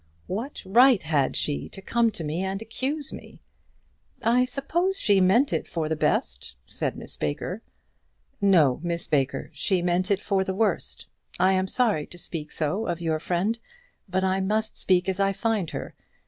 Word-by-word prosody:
"What 230 Hz, +10 st, -4 dB
right 240 Hz, +3 st, +5 dB
had 150 Hz, -4 st, +1 dB
she 145 Hz, -, -1 dB
to -, -, -9 dB
come 230 Hz, +4 st, +2 dB
to 165 Hz, -, -5 dB
me 155 Hz, +4 st, -2 dB
and 190 Hz, +1 st, -2 dB
accuse 265 Hz, +6 st, -3 dB
me?" -, -, -11 dB, 0.8 s
"I 245 Hz, +3 st, +4 dB
suppose 340 Hz, +9 st, 0 dB
she 200 Hz, -3 st, +4 dB
meant 220 Hz, +10 st, +4 dB
it -, -, -1 dB
for 160 Hz, -2 st, -2 dB
the 160 Hz, -, 0 dB
best," 150 Hz, -, -1 dB
said -, -, -3 dB
Miss -, -, -6 dB
Baker. 75 Hz, -, -3 dB, 0.8 s
"No, 165 Hz, -10 st, +4 dB
Miss 170 Hz, -1 st, -2 dB
Baker, 140 Hz, -3 st, 0 dB
she 175 Hz, +5 st, 0 dB
meant 180 Hz, +2 st, +1 dB
it 200 Hz, -2 st, +2 dB
for 195 Hz, -2 st, 0 dB
the 190 Hz, 0 st, -3 dB
worst. 220 Hz, +2 st, -1 dB, 0.3 s
I 185 Hz, +2 st, +4 dB
am 190 Hz, 0 st, +1 dB
sorry 210 Hz, -, +1 dB
to 175 Hz, -, -10 dB
speak 160 Hz, -3 st, -6 dB
so 175 Hz, +9 st, -1 dB
of 170 Hz, -, -2 dB
your 160 Hz, -2 st, -1 dB
friend, 185 Hz, +8 st, -1 dB, 0.5 s
but 190 Hz, +1 st, 0 dB
I 190 Hz, 0 st, +1 dB
must 215 Hz, +3 st, -1 dB
speak 185 Hz, 0 st, +2 dB
as 190 Hz, 0 st, -1 dB
I 195 Hz, 0 st, +2 dB
find 205 Hz, -3 st, -1 dB
her. -, -, -6 dB
190 Hz, 175 wpm, -26 LUFS, 170-225 Hz, 0.8 s, right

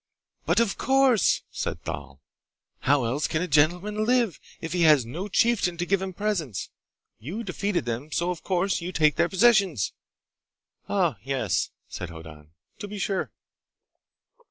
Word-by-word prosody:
"But -, -, +3 dB
of 230 Hz, -4 st, 0 dB
course!" 265 Hz, -6 st, +3 dB
said -, -, -4 dB
Thal. 70 Hz, +1 st, -7 dB, 0.6 s
"How 140 Hz, -1 st, +2 dB
else 130 Hz, +6 st, 0 dB
can 160 Hz, +1 st, -1 dB
a -, -, -2 dB
gentleman 180 Hz, +8 st, +2 dB
live, 235 Hz, -5 st, +2 dB, 0.2 s
if 165 Hz, 0 st, -5 dB
he 180 Hz, -, 0 dB
has 150 Hz, -6 st, +6 dB
no 170 Hz, -, -5 dB
chieftain 205 Hz, -4 st, +2 dB
to 175 Hz, -, -1 dB
give 195 Hz, +1 st, +1 dB
him 190 Hz, 0 st, -3 dB
presents? 170 Hz, -, -3 dB, 0.5 s
You 170 Hz, -, -5 dB
defeated 200 Hz, -, -2 dB
them, 120 Hz, +6 st, -4 dB
so 175 Hz, +3 st, 0 dB
of 175 Hz, -, -6 dB
course 190 Hz, 0 st, 0 dB
you 175 Hz, +2 st, -4 dB
take 155 Hz, -4 st, +3 dB
their 170 Hz, 0 st, +2 dB
possessions!" 190 Hz, -, +3 dB, 1.0 s
"Ah, 175 Hz, -, +1 dB
yes," 130 Hz, -6 st, -1 dB, 0.2 s
said 90 Hz, -, -6 dB
Hoddan. 80 Hz, -2 st, -11 dB, 0.3 s
"To 205 Hz, -, -5 dB
be 205 Hz, +1 st, -7 dB
sure!" 195 Hz, -1 st, -2 dB
175 Hz, 155 wpm, -26 LUFS, 140-200 Hz, 1.0 s, has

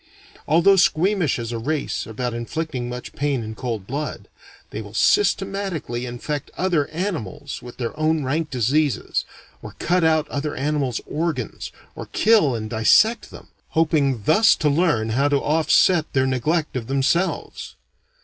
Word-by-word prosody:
Although 170 Hz, +5 st, +5 dB
squeamish 185 Hz, -2 st, +2 dB
as 115 Hz, -1 st, -5 dB
a 115 Hz, -, -3 dB
race 145 Hz, +3 st, -2 dB
about 120 Hz, +2 st, -3 dB
inflicting 125 Hz, +1 st, -4 dB
much 125 Hz, 0 st, -7 dB
pain 140 Hz, -4 st, -1 dB
in 110 Hz, 0 st, -6 dB
cold 115 Hz, -4 st, -4 dB
blood, 145 Hz, +7 st, -5 dB, 0.4 s
they -, -, -5 dB
will -, -, -11 dB
systematically 195 Hz, -, 0 dB
infect 140 Hz, +4 st, -5 dB
other 175 Hz, -6 st, +1 dB
animals 150 Hz, -, -4 dB
with 120 Hz, 0 st, -11 dB
their 120 Hz, +2 st, -4 dB
own 155 Hz, -1 st, +1 dB
rank 150 Hz, +4 st, -1 dB
diseases, 135 Hz, +3 st, 0 dB, 0.4 s
or -, -, -10 dB
cut 180 Hz, 0 st, +1 dB
out 160 Hz, -1 st, +3 dB
other 145 Hz, +1 st, -3 dB
animals' 140 Hz, -3 st, -1 dB
organs, 155 Hz, -6 st, -3 dB, 0.2 s
or -, -, -7 dB
kill 210 Hz, -, +4 dB
and 110 Hz, -1 st, -4 dB
dissect 210 Hz, -, +3 dB
them, -, -, -13 dB, 0.3 s
hoping 145 Hz, -8 st, +2 dB
thus 215 Hz, -, +5 dB
to 150 Hz, -, +1 dB
learn 140 Hz, -9 st, +1 dB
how 135 Hz, +6 st, +2 dB
to 145 Hz, -1 st, +2 dB
offset 160 Hz, +3 st, +3 dB
their 130 Hz, -1 st, +2 dB
neglect 145 Hz, +5 st, 0 dB
of 120 Hz, -3 st, -3 dB
themselves. 140 Hz, +7 st, -1 dB
145 Hz, 150 wpm, -22 LUFS, 125-165 Hz, 0.4 s, Although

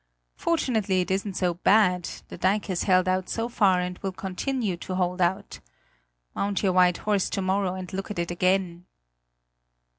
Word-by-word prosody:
Fortunately 220 Hz, -, 0 dB
it 180 Hz, -, -3 dB
isn't 195 Hz, 0 st, -1 dB
so 180 Hz, -2 st, +1 dB
bad; 180 Hz, -1 st, +3 dB, 0.2 s
the -, -, -7 dB
dike 195 Hz, +4 st, +1 dB
has 185 Hz, -3 st, -2 dB
held 185 Hz, 0 st, +4 dB
out 185 Hz, 0 st, 0 dB
so 230 Hz, 0 st, -2 dB
far 195 Hz, -6 st, +3 dB
and 180 Hz, 0 st, -4 dB
will 195 Hz, -, -3 dB
continue 195 Hz, +3 st, -3 dB
to 185 Hz, +2 st, -5 dB
hold 180 Hz, 0 st, -1 dB
out. 190 Hz, +3 st, -1 dB, 0.7 s
Mount 200 Hz, 0 st, -1 dB
your 190 Hz, -2 st, +2 dB
white 180 Hz, -1 st, +4 dB
horse 205 Hz, -3 st, 0 dB
to -, -, -2 dB
morrow 190 Hz, 0 st, 0 dB
and 185 Hz, -1 st, -7 dB
look 195 Hz, +2 st, -4 dB
at 210 Hz, -, -5 dB
it 170 Hz, 0 st, -2 dB
again!" 180 Hz, -1 st, 0 dB
185 Hz, 175 wpm, -26 LUFS, 180-200 Hz, 0.7 s, held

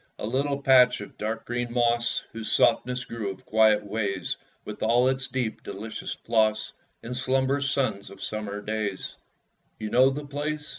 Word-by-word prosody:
A -, -, -4 dB
little 140 Hz, +5 st, 0 dB
patch 130 Hz, -2 st, +6 dB
of 105 Hz, -, -9 dB
dark 115 Hz, +1 st, -3 dB
green 120 Hz, 0 st, -2 dB
moss, 120 Hz, -1 st, +1 dB
Whose 115 Hz, -1 st, -4 dB
softness 125 Hz, 0 st, +2 dB
grew 115 Hz, -4 st, -4 dB
of 95 Hz, -, -9 dB
quiet 110 Hz, -1 st, +4 dB
ways 100 Hz, -3 st, -2 dB, 0.3 s
(With -, -, -7 dB
all 120 Hz, +3 st, +4 dB
its 135 Hz, 0 st, 0 dB
deep, 125 Hz, -4 st, -2 dB
delicious 110 Hz, +2 st, -6 dB
floss) 110 Hz, -1 st, +1 dB, 0.3 s
In 115 Hz, -, -6 dB
slumb'rous 135 Hz, +2 st, +1 dB
suns 130 Hz, -8 st, -1 dB
of 100 Hz, -, -13 dB
summer 105 Hz, -1 st, -4 dB
days. 105 Hz, -3 st, -3 dB, 0.6 s
You 110 Hz, -1 st, -5 dB
know 130 Hz, +2 st, +6 dB
the 145 Hz, +2 st, -4 dB
place? 150 Hz, +1 st, -3 dB
120 Hz, 160 wpm, -26 LUFS, 110-130 Hz, 0.6 s, patch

